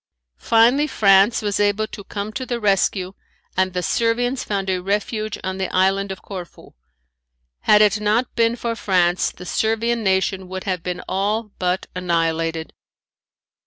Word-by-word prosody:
Finally 240 Hz, -, +4 dB
France 200 Hz, -3 st, +4 dB
was 205 Hz, -1 st, -1 dB
able 205 Hz, +1 st, +2 dB
to 205 Hz, -, -9 dB
come 205 Hz, +2 st, -5 dB
to 260 Hz, -, -4 dB
the 245 Hz, -2 st, -3 dB
rescue 195 Hz, -2 st, +1 dB, 0.4 s
and 185 Hz, 0 st, +1 dB
the 180 Hz, -1 st, -2 dB
Servians 245 Hz, +5 st, 0 dB
found 195 Hz, -2 st, -2 dB
a 185 Hz, -1 st, 0 dB
refuge 210 Hz, +2 st, -2 dB
on 190 Hz, 0 st, -3 dB
the 190 Hz, -, -2 dB
island 195 Hz, +1 st, +1 dB
of 190 Hz, -, -8 dB
Corfu. 185 Hz, -4 st, -9 dB, 0.9 s
Had 210 Hz, -, +5 dB
it 210 Hz, 0 st, +2 dB
not 215 Hz, +4 st, +1 dB
been 230 Hz, 0 st, +2 dB
for 235 Hz, -1 st, -3 dB
France 180 Hz, -4 st, +1 dB
the 180 Hz, -, -12 dB
Servian 225 Hz, +4 st, 0 dB
nation 190 Hz, -1 st, 0 dB
would 185 Hz, 0 st, -6 dB
have 185 Hz, -3 st, -2 dB
been 180 Hz, +1 st, -4 dB
all 210 Hz, +3 st, -1 dB
but 180 Hz, 0 st, 0 dB
annihilated. 165 Hz, -2 st, -1 dB
200 Hz, 155 wpm, -21 LUFS, 185-220 Hz, 0.9 s, Had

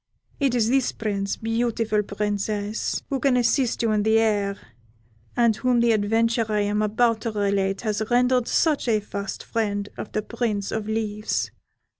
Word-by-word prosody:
It 270 Hz, -3 st, +2 dB
is 225 Hz, -3 st, +2 dB
this 265 Hz, 0 st, +2 dB
Prince, 200 Hz, -2 st, -2 dB
beautiful 225 Hz, -1 st, 0 dB
Princess, 205 Hz, +1 st, -2 dB
who 270 Hz, -, 0 dB
can 260 Hz, -1 st, +3 dB
assist 245 Hz, 0 st, +1 dB
you 225 Hz, -, +2 dB
in 210 Hz, -1 st, +2 dB
the 220 Hz, +1 st, +3 dB
air, 205 Hz, -3 st, +1 dB, 0.8 s
and 235 Hz, -2 st, +4 dB
whom 250 Hz, +1 st, +1 dB
the 235 Hz, 0 st, +4 dB
adventure 225 Hz, +2 st, +1 dB
I 210 Hz, -1 st, +2 dB
am 205 Hz, +1 st, 0 dB
about 220 Hz, +1 st, +2 dB
to 230 Hz, -, -2 dB
relate 200 Hz, -2 st, 0 dB
has 215 Hz, -2 st, -1 dB
rendered 250 Hz, 0 st, +3 dB
such 310 Hz, -6 st, +1 dB
a 220 Hz, -2 st, +3 dB
fast 200 Hz, -1 st, -6 dB
friend 205 Hz, -3 st, -2 dB
of -, -, -6 dB
the 215 Hz, -, -2 dB
Prince 215 Hz, -4 st, -2 dB
of 220 Hz, -1 st, -3 dB
Leaves. 215 Hz, -1 st, -2 dB
220 Hz, 165 wpm, -24 LUFS, 205-235 Hz, 0.8 s, and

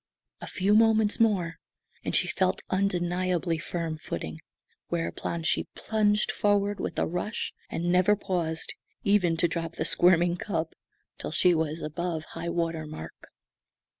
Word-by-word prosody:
A -, -, -6 dB
few 195 Hz, +2 st, +1 dB
moments 220 Hz, -1 st, +4 dB
more 190 Hz, -8 st, +2 dB, 0.4 s
and -, -, -1 dB
she -, -, +3 dB
felt -, -, 0 dB
undeniably 180 Hz, -2 st, 0 dB
firm 165 Hz, -2 st, -3 dB
footing; 80 Hz, -, -5 dB, 0.5 s
whereupon 170 Hz, 0 st, -2 dB
she 160 Hz, -, +1 dB
plunged 210 Hz, -1 st, +1 dB
forward 205 Hz, 0 st, +1 dB
with -, -, -3 dB
a -, -, +2 dB
rush, 180 Hz, +6 st, -3 dB, 0.2 s
and 175 Hz, +1 st, -1 dB
never 185 Hz, +3 st, +5 dB
paused, 170 Hz, -5 st, -2 dB, 0.3 s
even 185 Hz, -5 st, +3 dB
to 175 Hz, -, +4 dB
drop 165 Hz, 0 st, -3 dB
the -, -, -2 dB
squirming 175 Hz, 0 st, +4 dB
cub, 165 Hz, -5 st, -2 dB, 0.5 s
till -, -, -4 dB
she 180 Hz, -, +4 dB
was 160 Hz, 0 st, -1 dB
above 160 Hz, +1 st, -3 dB
high 165 Hz, +1 st, -4 dB
water 165 Hz, -2 st, -1 dB
mark. 80 Hz, -, -9 dB
175 Hz, 140 wpm, -28 LUFS, 165-200 Hz, 0.5 s, never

